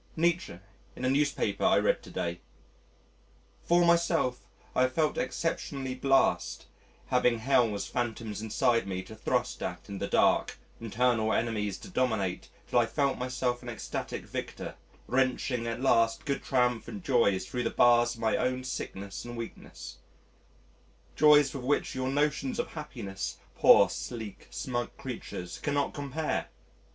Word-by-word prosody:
Nietzsche 170 - 0 0.4
in 130 - -4
a - - +3
newspaper 140 -8 0
I - - +5
read - - +2
to - - -13
day: 85 0 -3 1.2
"For 175 0 +4
myself 170 -7 +2 0.3
I - - +3
have 130 0 +2
felt 155 0 +1
exceptionally 135 -1 -2
blest 135 +1 +2 0.4
having 125 -2 +3
Hell's 115 -4 +2
phantoms 110 -3 -3
inside 110 0 +1
me 95 -1 -3
to 110 - -11
thrust 110 - -1
at - - -5
in 100 -1 -5
the - - -2
dark, - - +2 0.2
internal 115 -1 +1
enemies 105 -4 0
to - - -11
dominate 110 - -1 0.2
till 120 - +3
I 115 - +3
felt 140 0 0
myself 125 -1 -1
an 120 - -7
ecstatic 115 - -5
victor, - - -5 0.3
wrenching 125 -1 0
at 115 +1 -3
last 115 -3 +3
good 140 -1 -1
triumphant 125 - 0
joys 115 -8 +3
thro' 125 -2 -3
the 115 - 0
bars 120 0 +4
of 115 - -12
my 110 -1 +2
own 130 0 0
sickness 100 -6 -5
and 120 0 -7
weakness 115 - -8 1.2
joys 145 -3 +6
with 135 - -5
which 145 +3 0
your 130 0 -2
notions 150 - 0
of 240 - -2
happiness, 120 -11 -6 0.2
poor - - +7
sleek 110 -5 -6
smug 120 -4 -4
creatures, 110 -8 -6
cannot 145 -1 0
compare! 145 +2 -2
125 Hz, 145 wpm, -29 LUFS, 115-140 Hz, 1.2 s, poor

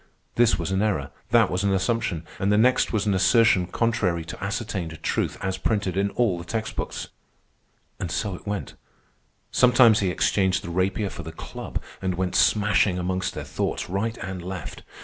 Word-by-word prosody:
This 120 -1 +4
was - - -3
an 95 +1 +1
error, 75 -11 0 0.2
that - - +4
was 90 +2 -1
an 100 - +2
assumption, 95 -3 0
and 100 +1 +1
the 105 - +4
next 125 +4 +3
was 110 -2 0
an 105 - +2
assertion 95 -1 +4
contrary 95 -7 0
to 85 - -8
ascertained 100 -6 -3
truth - - -1
as 95 0 -2
printed 100 -4 0
in 100 +1 +1
all 105 -6 +1
the - - -7
text 110 +5 -4
books. - - -4 0.9
And 90 - -3
so 95 +4 -2
it 90 - -10
went. 105 -1 -3 0.8
Sometimes 125 -3 +6
he 95 - +1
exchanged 95 +1 +1
the 85 - -6
rapier 95 +3 0
for - - -7
the 80 0 -7
club 80 - -6 0.2
and 95 -1 -1
went 90 0 -2
smashing 105 -3 +3
amongst 95 +1 -2
their - - -4
thoughts - - -3
right 110 +4 -1
and 95 -1 -5
left. 90 -2 -6
95 Hz, 185 wpm, -25 LUFS, 90-110 Hz, 0.9 s, Sometimes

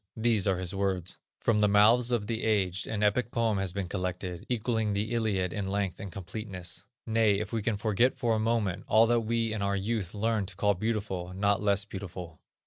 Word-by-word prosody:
These 110 -3 +2
are 95 -2 +2
his 90 0 -3
words: 95 -3 -2 0.2
"From 110 -2 +2
the 105 - +4
mouths 110 +4 +5
of 120 -4 0
the 115 +1 -2
aged 95 -4 +1
an 105 -1 -2
epic 105 +4 +2
poem 115 -4 +1
has 95 -2 -1
been 95 0 -3
collected 90 -1 -4
equalling 110 -3 0
the 105 +3 -1
Iliad 105 -6 0
in 100 - -2
length 100 -2 -1
and 100 -2 -6
completeness; 95 0 -6 0.2
nay, 110 -2 +3
if 110 +1 -5
we 115 - 0
can 105 0 0
forget 110 +4 +2
for 115 -2 +1
a 110 - +1
moment, 110 -5 0
all 110 +1 +6
that 120 +1 +3
we 115 0 0
in 110 - -3
our 100 0 +1
youth 100 -1 -2
learned 110 -1 0
to 95 - -8
call 100 +1 +2
beautiful, 95 -3 -3
not 100 0 +2
less 100 -1 +2
beautiful. 90 -5 -8
105 Hz, 210 wpm, -29 LUFS, 95-110 Hz, 0.2 s, all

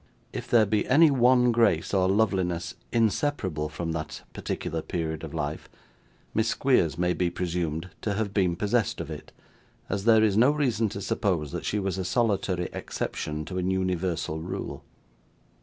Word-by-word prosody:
If - - -5
there 115 -2 +5
be 105 0 0
any 155 +4 +6
one 125 -1 +4
grace 115 -9 +2
or 95 -1 +3
loveliness 95 -4 +1 0.2
inseparable 110 - 0
from 80 +2 -4
that 80 -1 -5
particular 80 0 -3
period 80 -2 -3
of - - -6
life, - - -4 0.6
Miss 110 +1 +1
Squeers 100 - +2
may 90 0 +1
be 90 -1 0
presumed 85 -1 -3
to 105 -2 -1
have 100 -1 -2
been 95 -4 +2
possessed 105 +3 0
of 80 -1 -5
it, 75 - -8 0.6
as 100 +1 -2
there 110 -1 +6
is 105 -3 +3
no 120 +5 +6
reason 125 -7 +1
to 100 - -6
suppose 85 -8 0
that - - -5
she 105 - 0
was 95 -2 -2
a - - -1
solitary 95 -4 0
exception 75 0 -4
to 95 +2 -4
an 90 +1 0
universal 90 -4 -1
rule. 85 +3 -5
95 Hz, 165 wpm, -27 LUFS, 85-110 Hz, 0.6 s, any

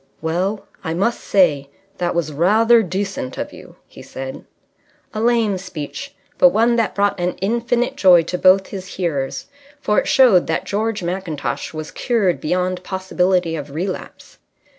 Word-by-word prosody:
"Well, 185 +6 -2 0.2
I 160 -2 -3
must 200 +7 0
say 150 -8 +2 0.3
that 175 -1 -1
was 160 -3 -1
rather 220 +9 +4
decent 190 -8 -4
of - - -5
you," - - -13
he - - -14
said. 130 0 -7 0.7
A 215 - -3
lame 225 -4 +2
speech, 185 - -7 0.2
but 270 - +8
one 235 +1 +2
that 225 -3 0
brought 200 -1 +1
an 175 +1 0
infinite 235 +4 -1
joy 180 -3 +6
to 180 +2 -4
both 190 +1 +4
his 190 -2 -8
hearers. 145 -7 -2 0.3
For 210 -7 +2
it - - -3
showed 235 -10 +5
that 160 - -1
George 215 -1 -2
Mackintosh 170 -4 -3
was 155 -1 -7
cured 215 -8 0
beyond 180 +2 -1
possibility 185 -2 0
of 145 -2 -7
relapse. 185 +4 -6
185 Hz, 155 wpm, -20 LUFS, 170-210 Hz, 0.7 s, but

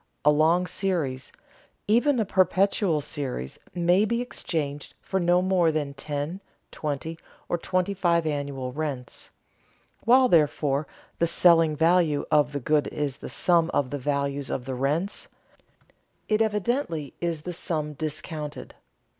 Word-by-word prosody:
A 150 - +7
long 160 +4 +3
series, 160 -10 -2 0.6
even 245 +5 +3
a 220 - +1
perpetual 185 -3 +2
series, 135 - -5 0.2
may 175 +3 +3
be 235 +2 0
exchanged 150 - -4
for 190 - -2
no 175 0 +3
more 185 -3 +3
than 150 -2 -2
ten, 145 +6 -4 0.3
twenty, 155 +2 -4 0.3
or 175 - -1
twenty 185 +3 0
five 170 -3 +2
annual 140 -4 -3
rents. 140 -4 -5 0.7
While 255 +3 +6
therefore 150 - +2 0.3
the 170 - +3
selling 165 -2 +4
value 165 -2 +3
of 150 -2 +4
the 145 - -3
good 150 +3 +1
is 145 -3 -3
the - - -8
sum 170 -2 +2
of 130 -3 +1
the 145 - -3
values 140 0 -1
of 125 - -3
the 135 - -4
rents, 150 +10 -1 1.0
it 215 0 +2
evidently 210 - -1
is 165 -3 -2
that 180 - -4
sum 155 -3 -3
discounted. 155 0 -5
160 Hz, 140 wpm, -26 LUFS, 145-180 Hz, 1.0 s, A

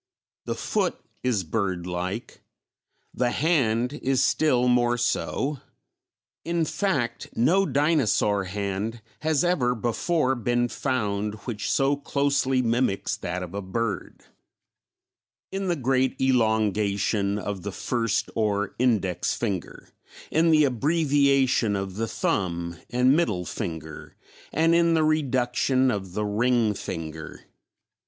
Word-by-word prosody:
The - - -2
foot - - -1 0.2
is 120 -7 0
bird 95 -1 -2
like; 90 +6 -4 0.7
the 125 -1 +1
hand 125 -5 +1
is 130 -1 +2
still 125 -6 +2
more 120 0 +3
so; 130 +3 -1 0.8
in 170 -1 0
fact, 145 - -1
no 185 +12 +3
dinosaur 135 - +2
hand 100 +4 -3 0.2
has 155 -1 +1
ever 135 -9 +2
before 130 +5 0
been 120 0 0
found 105 -5 -1
which 105 -4 -3
so 135 +1 +2
closely 140 -2 +1
mimics 115 -3 0
that 90 +1 -4
of 90 - -8
a 100 - -3
bird 100 +1 -4 1.3
in 195 0 -3
the 175 - +1
great 130 -2 0
elongation 105 -4 +1
of 100 -2 -4
the 100 +3 -4
first 115 +1 -1
or 100 -2 0
index 100 -8 +1
finger, 100 -7 -4 0.4
in 165 +1 +3
the 155 -1 +5
abbreviation 140 -4 +2
of 95 -1 -4
the 115 +1 -1
thumb 85 -5 -1
and 125 +3 +3
middle 105 - 0
finger, 80 -3 -6 0.4
and 165 +2 +3
in 170 -1 +4
the 160 - +3
reduction 130 -3 +2
of 95 -4 -4
the 105 +2 -1
ring 115 +1 +2
finger. 80 -4 -7
120 Hz, 120 wpm, -25 LUFS, 100-140 Hz, 1.3 s, the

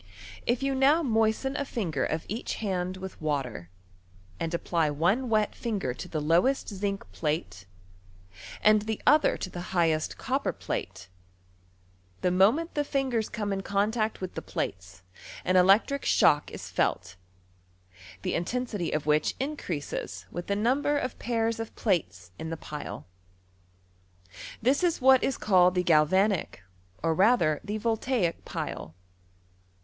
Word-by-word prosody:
If 240 +2 +1
^ou 275 0 0
now 285 +5 +4
moisten 225 +2 +1
a 285 - -1
finder 175 - -2
of 160 0 -2
each 220 +5 -3
hand 185 -3 -2
with 190 -2 -8
water, 135 - -3 0.7
and 165 - -2
apply 170 -2 0
one 185 - +1
wet 215 -1 +2
finger 205 - -2
to - - -8
the 155 - -3
lowest 170 - +2
zinc 200 -1 -3
plate, 150 - -3 1.0
and 215 0 +6
the 220 0 -3
other 300 +1 +5
to - - -4
the 175 - -6
fa^hest 170 -3 0
copper - - -1
plate, - - -5 1.1
the 180 - +2
moment 225 - +3
the 295 - 0
fingers 265 -6 -1
oome 210 -2 -2
in 195 - -2
contact 215 +3 0
with 185 - -5
the - - -5
plates 95 0 -5 0.4
an 185 - +2
electric 200 +10 +4
shock 145 0 +4
is - - -8
Celt, 90 -1 -1 1.1
the - - -1
intensity 205 0 -2
of 155 -2 -1
which 150 0 +2
increases 255 - -4
with 175 - -6
the 200 - 0
number 270 +7 +1
af 255 -3 -3
pairs 230 -1 -1
of 225 - -6
plates 95 - -1
in 160 - -5
the 165 - -4
pile. 150 - -7 1.6
This 270 +8 +3
is 345 -2 +2
what 265 -1 +6
is 270 - 0
called 180 -3 +4
the 180 - +2
Galvanic, 175 - +2 0.4
or 165 -1 +2
rather 185 -5 +3
the 210 +1 -3
Voltaic 220 -4 0
pile. 80 - -5
195 Hz, 145 wpm, -28 LUFS, 165-235 Hz, 1.6 s, and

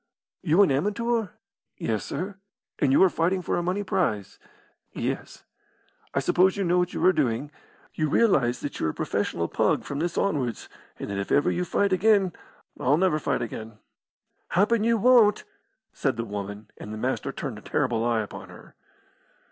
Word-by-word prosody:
"You 180 +3 +4
an 170 - +2
amateur?" 210 - 0 0.5
"Yes, 110 -2 -2
sir." 185 +7 -5 0.4
"And 140 -4 +2
you 140 - +6
are - - +7
fighting 180 +3 0
for - - -1
a 175 - 0
money 185 +4 -1
prize?" 110 - -1 0.5
"Yes." - - -4 0.7
"I - - +3
suppose 190 +2 +3
you 200 - 0
know 175 0 +2
what 180 0 -1
you - - 0
are 185 - +6
doing? 145 -2 -1 0.4
You 155 -1 -1
realise 135 - +2
that 145 - -5
you're 80 - 0
a - - -4
professional 85 0 -1
pug - - +1
from 140 - -5
this 170 +2 -2
onwards, 135 - -1 0.3
and - - -6
that 100 - -2
if 100 - -4
ever 145 - +3
you 180 - -1
fight 200 +2 +1
again 195 -1 +3 0.2
" - - -29
"I'll 140 +4 +3
never 175 -3 +2
fight 140 -4 -1
again." 110 -1 -7 0.7
"Happen 210 +4 +2
you 230 0 +3
won't," 230 -2 +5 0.5
said - - -1
the 115 - -2
woman, 105 0 -6
and 105 - -8
the 110 - -5
Master 130 +4 -2
turned 135 -6 -5
a - - -16
terrible 120 -4 0
eye 115 -1 +1
upon 105 - -8
her. - - -14
155 Hz, 180 wpm, -26 LUFS, 115-190 Hz, 0.7 s, are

